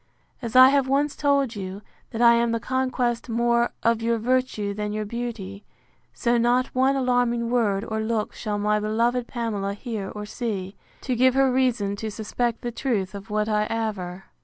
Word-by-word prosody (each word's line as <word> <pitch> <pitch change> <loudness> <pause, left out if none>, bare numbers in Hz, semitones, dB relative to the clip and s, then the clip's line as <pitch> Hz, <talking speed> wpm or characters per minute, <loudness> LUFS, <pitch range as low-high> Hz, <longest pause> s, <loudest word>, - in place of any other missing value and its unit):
As 235 -1 -5
I 255 +1 +10
have 275 -1 +2
once 280 +2 +1
told 280 -4 +1
you, 195 +1 -6 0.3
that 230 +1 -1
I 235 0 +8
am 235 0 +2
the 230 - 0
conquest 255 -2 -1
more 235 +1 +2
of 230 -1 +2
your 230 0 +1
virtue 230 -3 0
than 210 0 -3
your 215 0 -2
beauty; 210 -3 -5 0.5
so 240 0 +1
not 245 +2 +2
one 265 +2 +3
alarming 245 -2 +1
word 215 -4 +1
or 220 0 -2
look 220 -1 -1
shall 210 -2 -3
my 210 +1 +1
beloved 235 +3 0
Pamela 210 -5 -3
hear 210 -4 -5
or 210 0 -6
see, 205 -4 -4 0.3
to 255 - -1
give 255 +2 +4
her 270 -1 +4
reason 240 -6 +1
to 220 +1 -4
suspect 230 +2 -2
the 240 - -3
truth 220 -6 -2
of 200 -1 -9
what 210 0 0
I 210 -1 +1
aver. 195 -5 -3
230 Hz, 185 wpm, -24 LUFS, 210-245 Hz, 0.5 s, I